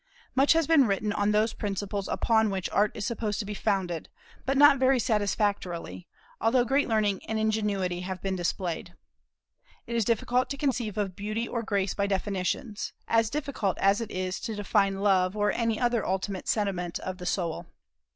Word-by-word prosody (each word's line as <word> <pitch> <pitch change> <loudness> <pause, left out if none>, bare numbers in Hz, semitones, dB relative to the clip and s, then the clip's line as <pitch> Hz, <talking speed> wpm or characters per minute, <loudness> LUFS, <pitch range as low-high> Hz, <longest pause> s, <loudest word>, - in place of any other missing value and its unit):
Much 270 +4 +5
has 325 -1 +2
been 285 -5 +5
written 205 +1 0
on 205 0 +1
those 215 +2 +2
principles 200 -1 -3
upon 220 -1 +2
which 190 -2 -2
Art 205 +1 +3
is 205 - -3
supposed 215 -3 -2
to 220 - -3
be 210 - -4
founded, 190 -6 -1 0.4
but 270 +1 +1
not 290 -1 +7
very 260 0 +4
satisfactorily, 200 - -1 0.3
although 240 +2 +3
great 275 +4 +2
learning 210 -3 +1
and 220 - -1
ingenuity 210 -5 0
have 185 0 -5
been 195 -1 -2
displayed. 175 -1 -3 0.9
It 235 - -4
is 230 - +2
difficult 240 +3 +1
to 280 - -4
conceive 245 -7 -1
of 195 -3 -2
beauty 215 +4 -3
or 235 - -2
grace 200 -4 -1
by 200 0 0
definitions, 200 +2 -2
as 225 -1 +3
difficult 270 -8 -2
as 195 +3 +3
it 225 - -4
is 185 -1 -3
to 220 - -4
define 195 -1 +1
love 190 -1 +3
or 205 0 +2
any 230 -2 0
other 240 -3 +1
ultimate 190 0 -2
sentiment 185 -5 -1
of 185 0 -6
the 180 - -5
soul. 170 -3 -2
205 Hz, 180 wpm, -28 LUFS, 190-230 Hz, 0.9 s, not